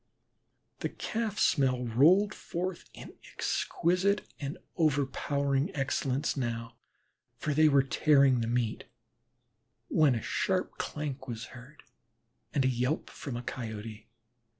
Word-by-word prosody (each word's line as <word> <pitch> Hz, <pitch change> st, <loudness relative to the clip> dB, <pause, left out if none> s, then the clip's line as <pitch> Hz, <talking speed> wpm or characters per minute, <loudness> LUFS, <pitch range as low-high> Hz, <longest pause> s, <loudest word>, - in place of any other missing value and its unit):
The -, -, -2 dB
Calf 220 Hz, -2 st, -3 dB
smell 130 Hz, -4 st, +2 dB
rolled 170 Hz, -, +4 dB
forth 180 Hz, +1 st, -4 dB
in -, -, -10 dB, 0.2 s
exquisite 185 Hz, +4 st, 0 dB
and 140 Hz, -1 st, -4 dB, 0.2 s
overpowering 140 Hz, -1 st, +1 dB
excellence 135 Hz, 0 st, 0 dB
now, 115 Hz, -3 st, -3 dB, 0.6 s
for 150 Hz, -, -1 dB
they 155 Hz, +1 st, +5 dB
were 140 Hz, -2 st, +5 dB
tearing 140 Hz, -2 st, +4 dB
the 115 Hz, -, -1 dB
meat, 120 Hz, -1 st, -1 dB, 1.0 s
when 150 Hz, -5 st, +4 dB
a 115 Hz, -, -2 dB
sharp 190 Hz, -1 st, -1 dB
clank 140 Hz, -3 st, -4 dB
was 115 Hz, -2 st, -5 dB
heard 130 Hz, +4 st, -13 dB, 0.7 s
and 135 Hz, -2 st, +1 dB
a -, -, +5 dB
yelp 125 Hz, +4 st, -1 dB
from 135 Hz, -5 st, -6 dB
a 120 Hz, -, -6 dB
Coyote. 110 Hz, -2 st, -6 dB
140 Hz, 120 wpm, -30 LUFS, 125-155 Hz, 1.0 s, they